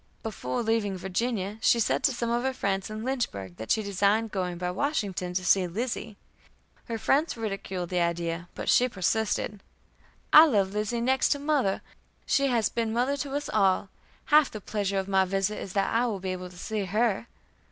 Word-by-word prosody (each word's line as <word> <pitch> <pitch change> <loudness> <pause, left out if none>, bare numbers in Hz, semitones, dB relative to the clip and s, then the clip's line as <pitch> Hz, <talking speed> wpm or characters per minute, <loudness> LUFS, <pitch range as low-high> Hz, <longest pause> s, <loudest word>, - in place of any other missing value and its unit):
Before 210 - -3
leaving 220 -4 0
Virginia 200 +2 -2
she 235 - +4
said 225 - +1
to 275 - +4
some 235 -2 -2
of 240 +1 +1
her 265 +1 -1
friends 195 -3 -1
in 215 +1 -5
Lynchburg 100 - -3
that 110 - -7
she 220 - +2
designed 200 +3 +1
going 180 -3 -2
by 180 0 -2
Washington 190 - -2
to 185 0 -1
see 190 -1 +4
Lizzie. 220 +2 -4 0.7
Her 230 -2 -3
friends 285 +5 +1
ridiculed 195 -5 -4
the 180 - 0
idea, 170 0 -1
but - - -6
she 250 +1 +4
persisted: 205 +1 -1 0.7
"I 315 +2 +10
love 200 -8 +1
Lizzie 215 +3 -1
next 260 +2 +2
to - - -5
mother. 280 -9 0 0.4
She 275 0 +2
has 235 -5 +2
been 230 -1 -2
a - - -3
mother 255 +4 +1
to 280 -1 -4
us 290 0 -2
all. 190 0 +2 0.4
Half 300 -1 +5
the 215 - -7
pleasure 200 -1 -2
of 190 0 -1
my 190 -1 +3
visit 195 +2 -1
is 185 - -7
that 195 -1 +1
I 235 +2 +2
will 210 -4 -2
be 185 0 -3
able 185 0 -5
to 180 - -15
see 210 +2 -3
her." 215 +3 0
210 Hz, 195 wpm, -27 LUFS, 185-235 Hz, 0.7 s, I